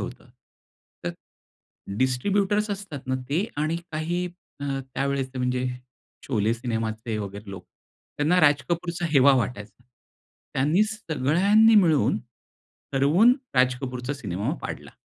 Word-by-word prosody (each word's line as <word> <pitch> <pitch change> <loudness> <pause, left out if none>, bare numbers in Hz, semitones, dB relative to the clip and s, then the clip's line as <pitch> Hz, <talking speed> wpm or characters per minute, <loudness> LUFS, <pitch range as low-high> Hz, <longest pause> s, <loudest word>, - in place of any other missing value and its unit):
होतं. - - -7 0.8
तर - - 0 0.9
डिस्ट्रिब्युटर्स 200 +11 +1
असतात 195 -8 -5
ना 130 - 0
ते 165 +8 +1
आणि 155 +3 0 0.2
काही 170 +3 -1 0.3
अ, - - -3 0.3
त्यावेळेचे 135 -1 -1
म्हणजे 125 0 0 0.6
शोले 110 -3 +1
सिनेमाचे 115 -1 -3
वगैरे 100 0 -6
लोक, 95 -2 -8 0.5
त्यांना 160 +5 +3
राज 145 -1 +4
कपूरचा 170 0 -2
हेवा 140 -1 +6
वाटायचा. 110 -3 -4 0.7
त्यांनी 150 +9 +3
सगळ्यांनी 205 +3 +3
मिळून, 160 - +4 0.7
ठरवून 155 - +5 0.2
राज 125 0 +4
कपूरचा 125 0 -4
सिनेमा 100 -7 -3
पाडला. - - -6
140 Hz, 110 wpm, -25 LUFS, 125-175 Hz, 0.9 s, हेवा